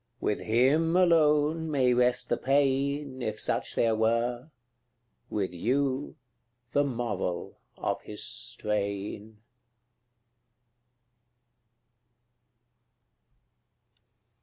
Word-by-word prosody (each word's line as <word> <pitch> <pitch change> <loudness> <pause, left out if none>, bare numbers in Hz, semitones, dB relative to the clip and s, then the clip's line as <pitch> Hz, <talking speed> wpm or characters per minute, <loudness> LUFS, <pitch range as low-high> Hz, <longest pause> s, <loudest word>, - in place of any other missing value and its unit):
with 105 - -1
HIM 145 +9 +2
alone 160 -2 +3
may 130 -4 +3
rest 125 0 +2
the - - +2
pain, 140 0 0
If 110 -2 -3
such - - -1
there 115 -1 +2
were 120 +4 0 0.8
with 95 -4 -2
YOU, 130 +8 -1 0.6
the 145 - +3
moral 115 -9 -3 0.2
of - - -2
his 105 0 -8
strain. 105 -3 -4
125 Hz, 75 wpm, -28 LUFS, 110-145 Hz, 0.8 s, alone